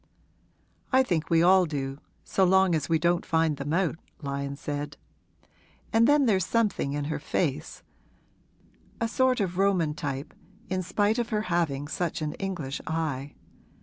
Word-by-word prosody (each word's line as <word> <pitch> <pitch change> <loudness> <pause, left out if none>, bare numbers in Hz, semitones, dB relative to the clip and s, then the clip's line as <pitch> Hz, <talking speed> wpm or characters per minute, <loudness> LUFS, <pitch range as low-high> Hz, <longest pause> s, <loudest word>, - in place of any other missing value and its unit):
'I 260 0 +5
think 165 -9 -1
we 165 0 +4
all 185 0 +5
do, 135 -2 -4 0.2
so 195 - +1
long 190 0 +4
as 150 -4 -1
we 165 - +4
don't 175 +2 +1
find 160 -2 +1
them 140 +2 -4
out,' 170 -1 0 0.2
Lyon 140 0 -3
said. 145 0 -5 1.0
'And 225 +1 +5
then 290 -1 +5
there's 195 -6 +3
something 210 -9 0
in 145 0 -2
her 150 0 -2
face 150 0 -2 1.2
a 230 - +1
sort 255 +2 +2
of 185 -2 -1
Roman 185 -6 +2
type, 140 -3 -5 0.4
in 185 0 0
spite 205 +5 +1
of 235 - -1
her 215 -2 0
having 145 -5 0
such 170 +2 -2
an 150 - -2
English 170 -8 -3
eye. 150 -4 -3
165 Hz, 155 wpm, -27 LUFS, 145-190 Hz, 1.2 s, I